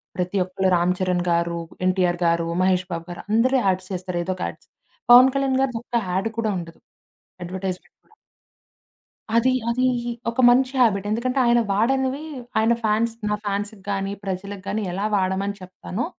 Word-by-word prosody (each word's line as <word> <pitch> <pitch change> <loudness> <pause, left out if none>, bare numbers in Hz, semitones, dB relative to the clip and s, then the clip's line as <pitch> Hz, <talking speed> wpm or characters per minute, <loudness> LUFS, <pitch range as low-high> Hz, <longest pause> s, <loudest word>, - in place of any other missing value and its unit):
ప్రతి 180 +2 -2
ఒక్కళ్ళు 185 +1 -1
రామ్ 175 +1 +2
చరణ్ 180 -1 0
గారు, 170 0 0 0.3
ఎన్టీఆర్ 180 -2 +1
గారు, 170 0 +2
మహేష్ 185 0 +2
బాబు 165 -1 -4
గారు 175 - -7
అందరూ 240 +5 +3
యాడ్స్ 185 -1 0
చేస్తారు. 180 -1 -3
ఏదో 185 +2 -2
ఒక 180 - -5
యాడ్స్. - - -15 0.4
పవన్ 255 +2 +9
కళ్యాణ్ 270 -1 +1
గారి 270 -2 0
దొక్క 235 0 -2
యాడ్ 190 +5 0
కూడా 220 -2 0
ఉండదు. 165 -1 -10 0.6
అడ్వర్టైజ్‌మెంట్. 185 +1 -5
కూడా. 435 - -28 1.2
అది, 235 +2 +4 0.2
అది 245 +2 0 0.5
ఒక 235 +3 0
మంచి 255 +1 +3
హాబిట్. 205 -4 +2
ఎందుకంటే, 250 +5 0
ఆయన 240 0 +4
వాడనివి 260 +6 +1 0.4
ఆయన 225 +2 +3
ఫాన్స్ 220 +2 +1 0.2
"నా 210 - +1
ఫాన్స్‌కి 205 +1 -3
గాని, 195 0 -2
ప్రజకి 195 +1 -4
గాని, 210 +2 -1
ఎలా 195 +3 -2
వాడమని 195 +1 -1
చెప్తాను, 185 +4 -5
195 Hz, 160 wpm, -23 LUFS, 185-235 Hz, 1.2 s, పవన్